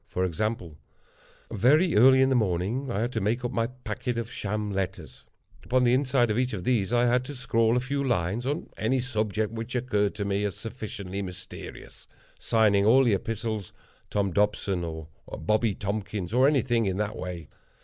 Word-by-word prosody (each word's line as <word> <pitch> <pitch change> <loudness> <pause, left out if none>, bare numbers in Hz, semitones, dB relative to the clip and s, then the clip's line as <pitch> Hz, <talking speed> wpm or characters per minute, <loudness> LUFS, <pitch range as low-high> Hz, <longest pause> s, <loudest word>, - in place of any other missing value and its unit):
For 95 - -1
example:—very 110 - -1
early 130 +4 +7
in 130 - +3
the 135 - +2
morning 110 +5 0
I 105 -3 -1
had 120 +2 -1
to - - -2
make 115 +5 0
up 120 - -2
my 115 -2 0
packet 125 -1 -5
of 115 0 -4
sham 105 0 -3
letters. 95 -1 -5 0.4
Upon 130 +1 +2
the 120 0 +4
inside 130 -3 +2
of 110 - 0
each 125 -1 0
of 95 -4 -4
these 110 -3 +1
I 120 0 +3
had 125 +1 +2
to 145 +2 -7
scrawl 115 -2 +2
a - - +3
few 140 +2 -2
lines 115 -1 0
on 145 +3 -3
any 130 +4 +1
subject 110 -4 -1
which 115 +3 -5
occurred 105 -5 0
to 100 -1 -3
me 100 0 0
as 100 -4 -2
sufficiently 100 -4 -6
mysterious—signing 100 +2 -2
all 125 +6 +6
the 120 -4 +3
epistles 110 0 -3 0.4
Tom 100 -2 0
Dobson, 100 -2 +1
or 80 -2 -6 0.3
Bobby 110 +4 +1
Tompkins, 100 -1 -4
or 130 +2 +5
anything 125 -6 +2
in 95 -1 -1
that 105 0 -2
way. 90 -2 -6
110 Hz, 180 wpm, -27 LUFS, 100-125 Hz, 0.4 s, early